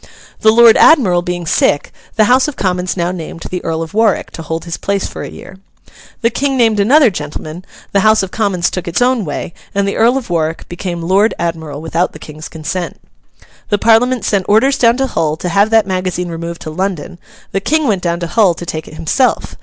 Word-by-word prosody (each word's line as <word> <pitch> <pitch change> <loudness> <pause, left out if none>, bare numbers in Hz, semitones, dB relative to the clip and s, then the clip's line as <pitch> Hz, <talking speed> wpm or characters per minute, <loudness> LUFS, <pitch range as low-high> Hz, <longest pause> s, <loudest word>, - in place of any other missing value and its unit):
The 220 - +4
Lord 230 0 +7
Admiral 195 - +5
being 175 0 -4
sick, 145 -2 +1 0.2
the 220 - +4
House 255 +5 +3
of 300 - -5
Commons 180 -1 -2
now 175 0 0
named 165 -2 -7
the 180 - -4
Earl 165 0 -2
of 160 - -10
Warwick 220 -1 +1
to - - -8
hold 160 +1 -5
his 170 -2 -4
place 200 -1 -2
for - - -7
a - - -6
year. 190 - -12 0.6
The 230 -1 +2
King 270 +2 -1
named 225 -4 +3
another 255 +4 +5
gentleman; 155 +1 -7 0.3
the 200 - +2
House 215 0 +4
of 190 - -5
Commons 195 -6 0
took 185 - -5
its 170 - -1
own 245 -4 +2
way, 150 +2 -5 0.2
and 200 0 +1
the 200 - -2
Earl 235 +4 +3
of 245 -8 -6
Warwick 165 -1 -2
became 175 -1 -5
Lord 195 +6 +2
Admiral 160 -3 -4
without 165 +2 -1
the - - -9
King's 155 0 -10
consent. 170 +1 -5 0.7
The 205 - +2
Parliament 230 +1 +3
sent 200 -4 0
orders 245 +7 +3
down 235 0 +4
to 270 - +1
Hull 155 -11 -1
to 180 - -4
have 200 +5 +3
that 225 -2 +4
magazine 185 -2 -2
removed 170 0 -6
to 155 - -6
London; 180 0 -4 0.3
the 195 - -1
King 310 +5 +1
went 200 -5 +1
down 170 -1 -1
to - - -1
Hull 195 -3 +3
to 175 - -7
take 160 -2 -5
it - - -11
himself. 165 - 0
185 Hz, 215 wpm, -15 LUFS, 170-220 Hz, 0.7 s, Lord